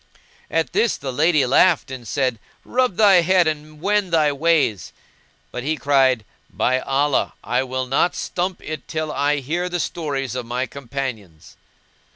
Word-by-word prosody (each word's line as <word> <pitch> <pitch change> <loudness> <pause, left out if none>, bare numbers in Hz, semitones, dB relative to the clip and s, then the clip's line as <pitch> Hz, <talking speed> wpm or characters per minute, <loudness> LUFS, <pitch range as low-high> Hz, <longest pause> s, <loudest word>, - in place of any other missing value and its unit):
At 165 0 -1
this 230 - +2
the 135 -2 -5
lady 155 0 +3
laughed 145 +3 +3
and 125 -3 -8
said, 130 -2 -1 0.3
"Rub 255 -5 +1
thy 195 -3 +6
head 180 +1 +3
and 155 -1 -4
wend 200 +1 0
thy 155 -3 +3
ways!"; 145 - +1 0.6
but 125 - -5
he 155 +3 0
cried, 135 -6 +2 0.2
"By 130 +1 +1
Allah, 140 +2 0
I - - 0
will 130 0 -3
not 135 +7 +1
stump 180 +1 -3
it 155 0 -6
till 155 -1 -3
I 145 +1 +1
hear 170 +7 -2
the 175 0 -2
stories 145 -6 -3
of 125 -2 -5
my 125 +2 -1
companions." 120 - -7
145 Hz, 160 wpm, -21 LUFS, 130-170 Hz, 0.6 s, thy